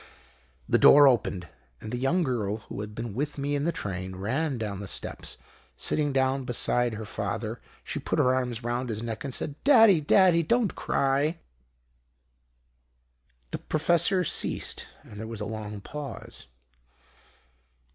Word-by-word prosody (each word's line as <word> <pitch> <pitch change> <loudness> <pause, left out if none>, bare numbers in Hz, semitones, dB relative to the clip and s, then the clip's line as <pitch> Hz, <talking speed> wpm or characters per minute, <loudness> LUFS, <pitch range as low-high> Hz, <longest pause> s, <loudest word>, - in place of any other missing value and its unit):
"The - - +3
door 145 0 +8
opened, 100 -8 +1 0.3
and 110 - -8
the 125 - -2
young 165 +8 +2
girl, 110 -7 -1
who - - -5
had 105 0 -7
been 115 -2 -5
with 145 +6 -3
me 140 +1 -2
in 145 0 0
the 170 - +2
train, 95 - -5
ran 130 +9 -1
down 105 -4 -4
the 100 - -6
steps. - - -4 0.4
Sitting 145 -2 0
down 135 0 +1
beside 120 -1 +1
her 110 0 -6
father - - -4 0.2
she - - -4
put - - -2
her 125 - +4
arms 125 -2 -2
round 120 +1 -2
his 110 0 -4
neck 115 +3 -5
and 140 - -4
said, 145 +3 -4
'Daddy, 225 - +6
Daddy, 170 +2 +5
don't 220 +5 +1
cry!'" 140 +4 0 2.1
The - - -3
Professor 170 +4 +2
ceased - - -1 0.2
and 105 - -12
there 110 - -5
was 115 -1 -6
a 105 - -3
long 105 -1 -6
pause. 145 - -7
130 Hz, 155 wpm, -27 LUFS, 110-150 Hz, 2.1 s, door